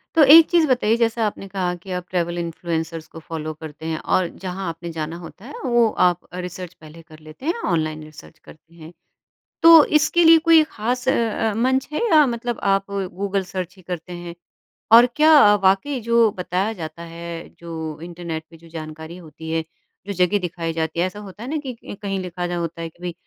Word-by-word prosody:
तो 320 - +7
एक 325 0 +9
चीज़ 340 -2 +4
बताइए 240 -4 +2
जैसा 230 -1 +1
आपने 195 -1 -6
कहा 185 -2 -2
कि 185 +2 -11
आप 180 -1 -3
ट्रैवल 175 -1 -1
इन्फ्लुएंसर्स 165 -1 -4
को 165 - -11
फॉलो 155 -1 -6
करते 155 0 -10
हैं 160 -1 -2
और 185 -1 +1 0.2
जहाँ 185 0 -4
आपने 170 +1 -7
जाना 160 +1 -5
होता 175 +5 -12
है 285 - -10
वो 240 -2 +3 0.2
आप 175 -1 +2
रिसर्च 180 0 -7
पहले 160 +1 -14
कर 155 -1 -16
लेते 155 - -13
हैं, 335 - +1
ऑनलाइन 155 -3 -1
रिसर्च 155 +1 -14
करते 160 +1 -18
हैं। 160 -1 -12 0.7
तो 330 -2 +10
इसके 335 +3 +2
लिए 325 0 +8
कोई 325 -1 +7
ख़ास 250 -2 -3
अ - - +5
अ, 225 -1 0
मंच 260 +3 +1
है - - -1
या 305 -2 +7
मतलब 240 0 -3
आप 195 0 +2
गूगल 195 0 -2
सर्च 185 -1 -6
ही - - -16
करते 180 0 -7
हैं? 175 0 -8 0.6
और 235 +2 +9
क्या 300 -9 +7
वाक़ई 195 +9 +2
जो 235 0 +3
बताया 185 +3 -2
जाता 165 -2 -8
है 170 0 -8
जो 160 -2 -6
इंटरनेट 170 -2 -6
पे 165 - -15
जो 165 +1 -18
जानकारी 160 +1 -8
होती 160 -2 -10
है, 165 0 0 0.5
जो 200 - -3
जगह 180 +2 +2
दिखाई 170 -2 -4
जाती 160 +1 -3
है 175 - +3
ऐसा 185 +3 -6
होता 205 +1 -10
है 250 - -6
ना 315 - -1
कि 255 - -4 0.3
कहीं 195 -1 -2
लिखा 180 -1 -5
रहा 175 0 -3
होता 170 -1 -4
है 165 - -4
कि 175 - -26
भई 175 -1 -3
180 Hz, 205 wpm, -21 LUFS, 165-225 Hz, 0.7 s, तो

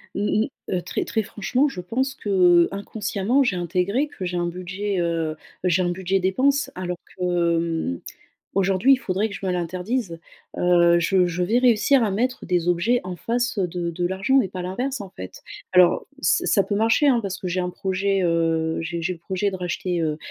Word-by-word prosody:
Mmh 210 +1 +1
mh. - - -6 0.2
Heu, 180 - 0
très - - -3
très 220 - -1
franchement, 245 +7 0
je 185 - -8
pense 260 +9 -1
qu'inconsciemment 195 +4 +2
j'ai 240 - 0
intégré 180 - 0
que 190 - -7
j'ai 180 0 -3
un 175 0 0
budget, 185 +3 -3
heu, 165 -2 -1 0.3
j'ai 180 0 +2
un 175 - +1
budget 190 +2 0
dépenses 270 +10 +1
alors 180 -1 -4 0.2
que, 175 -2 +1
mmh, 165 - -2 0.5
aujourd'hui, 195 +6 +3
il - - 0
faudrait 205 -3 -1
que 205 - -9
je - - -9
me - - 0
l'interdise. 180 +3 -3 0.4
Heu, 170 -1 +4
je 180 +1 +3
je 175 +1 -2
vais 220 +7 +2
réussir 250 +2 +4
à 210 - 0
mettre 250 +6 -1
des 175 -2 0
objets 200 +8 +2
en 185 0 -5
face, 240 +5 -1
heu, 190 - +2
de 175 0 -3
de 175 +1 -2
l'argent 195 +8 +1
mais 255 - +3
pas 185 0 -6
l'inverse, 245 +9 -3
en 195 -2 -7
fait. 95 - -10 0.3
Alors 180 -1 +4 0.2
ç - - +2
ça 200 - +4
peut 205 - -3
marcher, 230 +7 +3
hein, 255 -3 +4
parce 195 -3 -4
que 185 - -4
j'ai 180 +1 -2
un 180 0 -2
projet, 190 +1 -1
heu, 165 -1 +1
j'ai 165 +1 -4
j'ai 185 +3 -1
le - - -16
projet 190 +4 -2
de 190 - -5
racheter, 180 0 -2
heu 155 -2 -1
185 Hz, 205 wpm, -23 LUFS, 175-210 Hz, 0.5 s, Heu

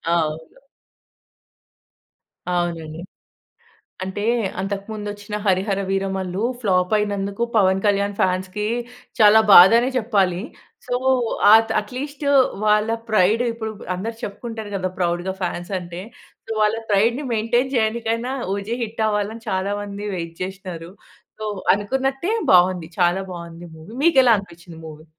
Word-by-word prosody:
అవును. 160 - -3 1.9
అవునండి. 170 -2 -2 1.0
అంటే 190 +2 -5 0.4
అంతకు 195 0 -3
ముందు 210 -1 -6
వచ్చిన 205 0 -9
'హరిహర 195 +1 +1
వీరమల్లు' 195 0 -2 0.2
ఫ్లాప్ 185 -2 +1
అయినందుకు 200 +1 -2
పవన్ 190 -2 +3
కళ్యాణ్ 200 0 +1
ఫాన్స్‌కి 185 +3 -1 0.5
చాలా 215 0 +7
బాధ 180 +3 +10
అనే 245 +2 +1
చెప్పాలి. 195 -6 +1 0.5
సొ 245 - 0 0.6
ఆ‌త్ 225 0 +6
అట్లీస్టు 280 +6 -5 0.4
వాళ్ళ 210 +1 +3 0.2
ప్రైడు 215 +4 +3
ఇప్పుడు‌పు 220 -2 -7
అందరు 225 +5 -5
చెప్పుకుంటారు 220 0 -7
కదా! 185 -1 -2
ప్రౌడ్‌గా 175 +1 -1
ఫాన్స్ 175 +1 -4
అంటే. 175 0 -8 0.6
వాళ్ళ 215 +1 +2
ప్రైడ్‌ని 230 +8 +2
మెయింటైన్ 240 +4 0
చేయనికైనా 230 +2 -1 0.2
'ఓజి' 215 +5 -4
హిట్ 220 0 -3
అవ్వాలని 210 +2 -2
చాలా 190 +2 -1
మంది 205 0 -6
వైట్ 170 -1 -5
చేశినారు. 185 -3 -7 0.5
సో 215 - -6 0.3
అనుకున్నట్టే 265 - -2 0.2
బావుంది 180 -2 +4
చాలా 175 +2 +2
బావుంది 170 0 -9
మూవీ. 160 +8 -13
మీకు 330 -5 +4
ఎలా 235 -2 +6
అనిపించింది 170 -3 -11
మూవీ? 155 0 -11
200 Hz, 120 wpm, -21 LUFS, 180-220 Hz, 1.9 s, బాధ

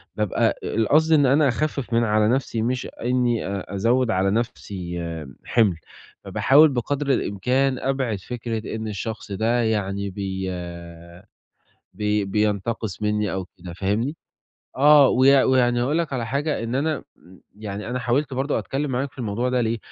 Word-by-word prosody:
بابقى 105 -3 0
القصد 150 +9 +2
اللي 145 -3 +5
إن - - +3
أنا 150 0 +4
أخفف 140 -1 -2
من 115 +1 +3
على 105 -1 +2
نفسي 120 -1 0
مش 125 +2 -1 0.2
إنّي 120 -1 +1
أ 100 0 -5
أزوّد 115 +4 +2
على 95 -1 +1
نفسي 95 -6 -3 0.5
حِمل، 110 -7 +3 0.5
فباحاول 150 +4 +5
بقدر 140 +2 -2
الإمكان 125 +6 0
أبعِد 130 -6 -1
فكرة 115 +1 -5
إن 110 0 -4
الشخص 110 +1 -5
ده 115 +5 +1
يعني 100 -2 -1
بي 95 -1 -4 1.5
بي 105 -1 0
بينتقص 105 0 -1
منّي 105 -1 0
أو 95 -1 -3
كده، 90 - -9
فاهمني؟ 105 - -1 0.6
آه، 145 0 +7
ويع 135 +1 +5
ويعني 120 -2 +3
أقول 145 +6 +1
لَك 165 -4 -2
على 120 -3 -2
حاجة 140 +3 -1
إن 115 +1 -3
أنا 150 +2 -1 0.2
امم، 95 +1 -18 0.2
يعني 105 0 -6
أنا 125 - -2
حاولت 130 +4 0
برضه 135 +3 0
أتكلم 140 +1 -3
معاك 130 +2 -2
في - - -22
الموضوع 120 +1 -1
ده 125 0 +1
ليه، 115 0 0
115 Hz, 155 wpm, -23 LUFS, 105-130 Hz, 1.5 s, آه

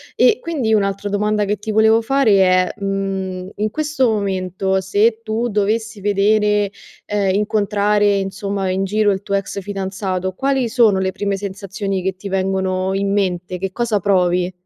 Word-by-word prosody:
E 435 - +4
quindi, 275 -10 -1
un'altra 200 -1 0
domanda 210 +1 0
che 205 +1 -1
ti 210 +2 -5
volevo 220 +1 +4
fare 265 -1 +2
è: 185 -1 +3
mhmm, 195 -2 -3
in 215 +1 -1
questo 295 -2 0
momento, 190 -2 -1
se 210 +4 +1
tu 230 +2 -2
dovessi 215 +1 -1
vedere, 205 0 +2 0.3
ehm, 200 -1 0
incontrare 205 -1 +1
insomma 195 0 -3
in 190 +1 0
giro 210 +2 +1
il 190 0 -3
tuo 200 - -4
ex 200 0 -2
fidanzato, 190 -1 -3
quali 270 +2 0
sono 220 -5 +3
le 190 0 0
prime 200 0 -2
sensazioni 195 -1 -4
che 190 0 -1
ti 195 +2 -8
vengono 190 0 -1
in 195 0 0
mente? 180 -3 -1
Che 190 +1 -4
cosa 220 -1 0
provi? 180 -2 +1
200 Hz, 160 wpm, -19 LUFS, 190-215 Hz, 0.3 s, E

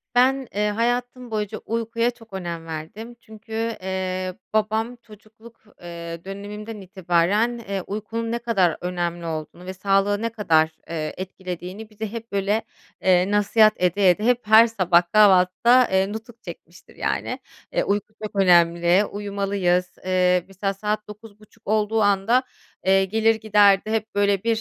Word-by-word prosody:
Ben, 265 +1 +3
eee, 210 +1 +1
hayatım 245 +2 -2
boyunca 215 0 -3
uykuya 230 +1 -1
çok 225 -3 -19
önem 170 -3 -5
verdim. 165 +9 -8
Çünkü, 220 -1 -16 0.3
eee, 185 0 -3 0.2
babam 220 +2 0
çocukluk, 220 +2 -17 0.2
eee, 170 -1 -8
dönemimden 205 +2 -7
itibaren, 190 +5 0
eee, 200 -4 -4
uykunun 225 +3 -4
ne 235 - -1
kadar 195 -9 +1
önemli 175 -1 -3
olduğunu 160 +2 -6
ve 185 - -5
sağlığı 195 +2 +1
ne 230 - -1
kadar, 165 -8 +2 0.2
eee, 155 -2 -3
etkilediğini 185 +2 -7
bize 215 0 -6
hep, 230 0 -8
böyle, 200 +2 0 0.4
eee, 185 +1 +3
nasihat 210 +1 +4
ede 180 +2 +2
ede, 180 +4 +1
hep 240 -1 +1
her 220 +2 +8
sabah 185 -6 +3
kahvaltıda, 210 +5 +5
eee, 190 +1 +2
nutuk 225 +1 -10
çekmiştir, - - -12
yani. - - -2 0.3
Eee, - - +1
uyku 205 +1 -2
çok 210 - -6
önemli. 175 0 +4
Uyumalıyız. 195 -3 -1 0.2
Eee, 180 -1 +2
mesela 195 +1 -3
saat 210 +2 -3
21.30 215 +1 -15
olduğu 215 +1 +1
anda, 205 +5 +3 0.4
eee, 195 0 +4
gelir 220 +3 +2
giderdi. 210 -1 +3
Hep 220 -1 -2
böyle 200 -1 +2
bir 230 -1 +1
205 Hz, 145 wpm, -23 LUFS, 185-220 Hz, 0.4 s, her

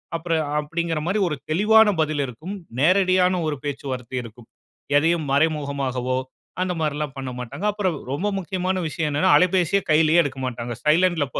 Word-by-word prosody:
அப்புறம் 165 -1 -1 0.2
அப்படிங்கற 165 +1 -2
மாரி 195 +5 0
ஒரு 155 - -2
தெளிவான 210 +6 +5
பதில் 155 -2 0
இருக்கும். 155 - -7 0.2
நேரடியான 185 +2 +3
ஒரு 150 - -1
பேச்சுவார்த்தை 130 -3 -4
இருக்கும். 115 0 -13 0.5
எதையும் 160 0 +1
மறைமுகமாகவோ 140 -4 0 0.4
அந்த 185 0 0
மாதிரிலாம் 150 -2 -2
பண்ணமாட்டாங்க. 125 - -6
அப்புறம் 195 -5 -1 0.2
ரொம்ப 150 +9 -1
முக்கியமான 185 0 -2
விஷயம் 155 0 -2
என்னன்னா 165 +6 +2
அலைபேசிய 180 +1 +2
கையிலயே 155 +2 +5
எடுக்க 135 -2 -5
மாட்டாங்க. 120 -1 -4
சைலன்ட்ல 165 0 +3
155 Hz, 135 wpm, -23 LUFS, 140-180 Hz, 0.5 s, தெளிவான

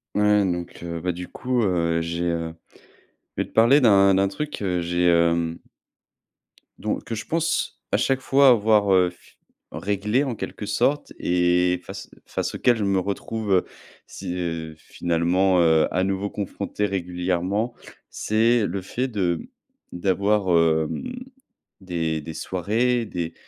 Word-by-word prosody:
Ouais. 105 0 +4
Donc, 90 -1 -4
heu, 85 -1 -4
bah, 90 +2 -1
du 90 +1 -7
coup, 125 -1 -1
heu, 85 -4 +1
j'ai, 85 +1 -3
heu 85 -1 -2 0.8
je - - +1
vais - - -8
te - - -23
parler 120 +6 +6
d'un 100 -5 +5
d'un 95 +1 +3
truc 150 +10 -5
que, - - -5
heu, 90 -2 0
j'ai, 85 +1 0
hem, 85 -1 +2 1.2
don - - -2
que 115 - -6
je 110 - -6
pense 165 +1 -1
à - - +5
chaque 135 -1 +1
fois 135 +1 +5
avoir, 105 -4 +4
heu, 90 -1 +4
f 85 - -23 0.3
réglé 105 +7 0
en 125 -4 -3
quelque 105 - -6
sorte 125 +8 0
et 90 0 +2
face - - -8 0.2
face - - -3
auquel 125 -2 +3
je 110 - -2
me 100 -1 +2
retrouve, 100 +2 -3
heu, 90 - +3 0.4
si - - -6
heu, 80 -3 -4
finalement, 85 +3 +1
heu, 80 -1 +4
à 90 - +1
nouveau 95 +1 -1
confronté 105 +1 -3
régulièrement. 90 +3 -1 0.4
C'est 115 +1 +2
le 95 +1 -4
fait 125 +7 -3
de 90 -8 -1 0.5
d'avoir, 100 +2 +1
hem, 85 - +1 0.7
des 80 -4 -2
des 80 - -7
soirées, 115 +9 0
des 85 -6 -5
95 Hz, 155 wpm, -23 LUFS, 85-105 Hz, 1.2 s, parler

